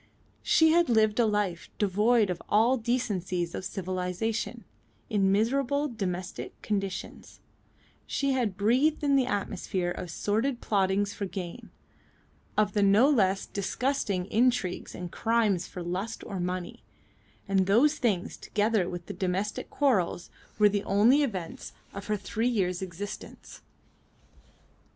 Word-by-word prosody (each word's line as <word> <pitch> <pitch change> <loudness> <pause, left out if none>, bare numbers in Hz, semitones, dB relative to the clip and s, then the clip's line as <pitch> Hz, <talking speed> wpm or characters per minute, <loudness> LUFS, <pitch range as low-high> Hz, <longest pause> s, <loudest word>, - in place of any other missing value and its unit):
She 320 -1 +4
had 340 -2 +3
lived 220 -1 +3
a 235 - +4
life 205 -5 -1
devoid 210 +1 +3
of 175 - -5
all 225 +5 +4
the 245 - -6
decencies 185 -8 -1
of - - -4
civilisation, 185 +3 -3 0.5
in 195 -2 +3
miserable 275 +7 +1
domestic 185 -5 -5
conditions; 195 -3 -4 0.7
she 275 -1 0
had 235 -7 0
breathed 260 +10 +2
in 280 -1 +3
the 260 -2 +3
atmosphere 190 -4 -2
of 180 0 -6
sordid 225 +9 -1
plottings 200 -1 +1
for 200 - -4
gain, 180 -3 -7 0.9
of 210 -1 +2
the 210 - +2
no 200 +6 +5
less 195 -7 +2
disgusting 205 -2 -1
intrigues 240 -5 +1
and 180 -1 -6
crimes 220 -6 +1
for 180 - -7
lust 185 +6 -4
or 195 - -5
money; 180 0 -4 0.7
and 190 -1 +2
those 280 +10 +4
things, 205 -8 0
together 210 -3 0
with 175 -1 -6
the - - -6
domestic 195 +2 -2
quarrels, 200 -11 0 0.3
were 210 0 +6
the 205 0 0
only 225 +9 +4
events 190 - -4 0.2
of 200 0 -7
her 210 0 0
three 220 +4 -1
years' 185 -6 0
existence. 190 +2 -8
205 Hz, 135 wpm, -28 LUFS, 185-235 Hz, 0.9 s, were